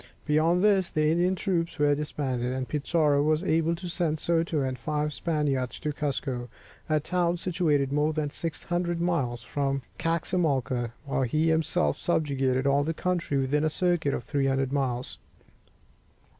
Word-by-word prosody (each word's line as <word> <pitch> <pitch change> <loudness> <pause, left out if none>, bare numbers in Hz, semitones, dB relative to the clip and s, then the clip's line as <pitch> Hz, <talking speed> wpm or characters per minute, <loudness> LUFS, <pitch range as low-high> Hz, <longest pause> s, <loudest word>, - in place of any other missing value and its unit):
Beyond 160 +4 +3
this, 195 -4 +4
the 155 0 +2
Indian 175 +3 +2
troops 175 -4 -1
were 145 0 +3
disbanded, 135 -4 -2
and 130 -1 -3
Pizarro 150 -1 +2
was 155 +3 +2
able 165 -1 +2
to 180 +2 -7
send 165 -2 -1
Soto 165 -2 +1
and 130 -2 -2
five 150 +3 -1
Spaniards 145 -7 -1
to 150 -1 -2
Cuzco, 135 -4 -3 0.4
a 155 0 +3
town 175 +2 0
situated 155 -6 +1
more 150 +1 +2
than 150 -2 -2
600 175 +2 -2
miles 140 -9 -1
from 135 -2 -1 0.2
Caxamalca, 155 -8 0
while 135 -1 -1
he 155 +6 +1
himself 155 - +1
subjugated 135 -5 0
all 140 +1 +3
the 160 +2 -2
country 175 -6 -1
within 135 +3 +1
a 155 - +2
circuit 175 -4 +1
of - - -5
300 135 0 0
miles. 130 -3 -2
150 Hz, 150 wpm, -27 LUFS, 135-170 Hz, 0.4 s, this